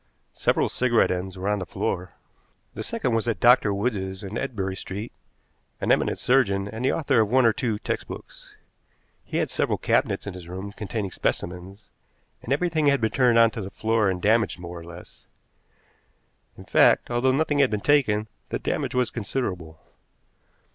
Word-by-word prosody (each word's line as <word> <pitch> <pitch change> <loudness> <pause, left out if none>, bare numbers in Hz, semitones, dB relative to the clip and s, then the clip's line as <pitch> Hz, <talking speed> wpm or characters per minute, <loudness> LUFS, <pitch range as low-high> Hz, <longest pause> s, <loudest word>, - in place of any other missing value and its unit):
Several - - +1
cigarette 120 -2 +2
ends 90 +1 -4
were 95 +2 -4
on 105 0 +1
the - - -3
floor. 90 +2 -3 0.6
The - - -6
second 125 - -2
was 115 +1 0
at 115 - -1
Dr. 120 -3 +5
Wood's 100 -3 -2
in 100 +2 -6
Ebury 105 -8 -3
Street, 100 +4 -6 0.7
an - - 0
eminent - - +2
surgeon, 100 -7 +2
and 110 +4 -6
the 130 - +3
author 140 -6 +1
of 105 - 0
one 130 +1 +4
or 115 - +5
two 115 -3 -1
textbooks. - - -7 0.7
He - - -4
had - - 0
several - - 0
cabinets - - 0
in 100 - -5
his 90 -2 -10
room 95 +3 -6
containing 105 -1 -4
specimens, 95 +5 -4 0.5
and 120 - -7
everything 155 0 +1
had 140 -1 +4
been 110 -1 0
turned 125 -3 +3
on 115 -1 +6
to 110 - -5
the 95 - -6
floor 110 -1 +1
and 90 -1 -2
damaged 105 -5 +2
more 85 0 -8
or - - -11
less. 85 +1 -13 1.3
In - - -12
fact, - - +4
although 120 +2 +2
nothing 145 +1 +1
had 140 -2 +5
been 105 - -1
taken, 110 -5 +2 0.2
the - - -1
damage - - -2
was 125 -1 +1
considerable. 95 -9 -4
110 Hz, 175 wpm, -25 LUFS, 95-125 Hz, 1.3 s, on